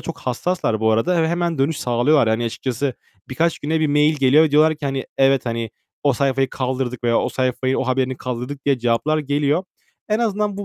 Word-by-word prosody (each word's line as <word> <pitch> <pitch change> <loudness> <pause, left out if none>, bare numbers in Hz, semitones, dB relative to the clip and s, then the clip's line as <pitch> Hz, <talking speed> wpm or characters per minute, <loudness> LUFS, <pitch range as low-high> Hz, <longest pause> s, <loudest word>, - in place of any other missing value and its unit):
çok 165 - -7
hassaslar 125 -3 -2
bu 110 0 +2
arada. 115 +12 +1
Ö - - +2
hemen 170 -1 -1
dönüş 140 +3 +1
sağlıyorlar. 125 +1 +2
Hani, 110 +2 0
açıkçası, 125 +3 -3 0.3
birkaç 160 +5 0
güne 160 +2 -1
bir 155 - +2
mail 150 +1 +3
geliyor 140 +3 +5
ve 155 - 0
diyorlar 155 +2 +4
ki: 150 - -4
"Hani, 135 -1 -3
evet, 135 -1 +3
hani, 115 -1 -3 0.3
o 140 -2 +3
sayfayı 135 +1 0
kaldırdık 125 -2 -3
veya 115 -1 +3
o - - -1
sayfayı, 130 0 -1
o - - -1
haberini 130 0 0
kaldırdık" 125 +3 -6
diye 140 -3 +2
cevaplar 120 +6 +1
geliyor. 145 +3 0 0.4
En 215 0 +1
azından 210 -3 -1
bu 205 - -5
135 Hz, 205 wpm, -20 LUFS, 125-155 Hz, 0.4 s, geliyor